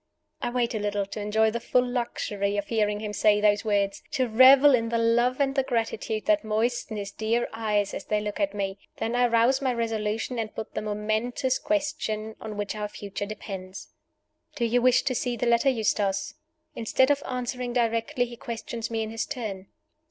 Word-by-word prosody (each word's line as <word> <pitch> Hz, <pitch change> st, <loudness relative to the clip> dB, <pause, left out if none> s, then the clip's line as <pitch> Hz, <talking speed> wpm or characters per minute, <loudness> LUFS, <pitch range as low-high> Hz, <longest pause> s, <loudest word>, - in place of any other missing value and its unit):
I -, -, -1 dB
wait 240 Hz, -1 st, 0 dB
a 220 Hz, -, -1 dB
little, 205 Hz, -1 st, -1 dB
to 205 Hz, +2 st, -6 dB
enjoy 220 Hz, +1 st, +2 dB
the 235 Hz, -, -2 dB
full 250 Hz, +1 st, +2 dB
luxury 205 Hz, -5 st, -2 dB
of 205 Hz, -, -3 dB
hearing 210 Hz, -2 st, +1 dB
him 210 Hz, -1 st, -4 dB
say 210 Hz, 0 st, +4 dB
those 210 Hz, -1 st, +3 dB
words 200 Hz, -2 st, 0 dB
to 255 Hz, -1 st, +1 dB
revel 260 Hz, +5 st, +7 dB
in 230 Hz, -2 st, +2 dB
the 230 Hz, -, 0 dB
love 240 Hz, +3 st, +2 dB
and 275 Hz, -1 st, +2 dB
the 270 Hz, -, +2 dB
gratitude 225 Hz, -3 st, -2 dB
that 315 Hz, -1 st, +3 dB
moisten 220 Hz, +1 st, -1 dB
his 200 Hz, -1 st, -5 dB
dear 225 Hz, +2 st, 0 dB
eyes 210 Hz, -3 st, 0 dB
as -, -, -5 dB
they 210 Hz, -, 0 dB
look 210 Hz, -1 st, -4 dB
at 300 Hz, -5 st, 0 dB
me. 195 Hz, -1 st, -3 dB, 0.2 s
Then 230 Hz, +2 st, -2 dB
I 245 Hz, 0 st, +4 dB
rouse 235 Hz, +3 st, +3 dB
my 265 Hz, -2 st, +1 dB
resolution, 225 Hz, 0 st, -2 dB
and 220 Hz, -1 st, -4 dB
put 220 Hz, -, -6 dB
the -, -, -2 dB
momentous 215 Hz, +5 st, -1 dB
question 285 Hz, -9 st, -2 dB
on 215 Hz, -2 st, -6 dB
which 205 Hz, -1 st, -2 dB
our 210 Hz, -1 st, -3 dB
future 205 Hz, -1 st, -6 dB
depends. 195 Hz, -2 st, -7 dB, 0.7 s
"Do 240 Hz, -5 st, 0 dB
you 240 Hz, +2 st, +2 dB
wish 255 Hz, 0 st, +4 dB
to 260 Hz, -, 0 dB
see 245 Hz, 0 st, -2 dB
the 245 Hz, -, -1 dB
letter, 235 Hz, +3 st, +4 dB
Eustace?" 205 Hz, -5 st, 0 dB, 0.4 s
Instead 260 Hz, +4 st, +2 dB
of 285 Hz, 0 st, +1 dB
answering 250 Hz, -1 st, -3 dB
directly, 230 Hz, 0 st, +1 dB
he 240 Hz, 0 st, -9 dB
questions 230 Hz, 0 st, -5 dB
me 225 Hz, -1 st, -1 dB
in 220 Hz, -, -5 dB
his 225 Hz, 0 st, -3 dB
turn. 210 Hz, -8 st, -5 dB
225 Hz, 195 wpm, -26 LUFS, 210-245 Hz, 0.7 s, revel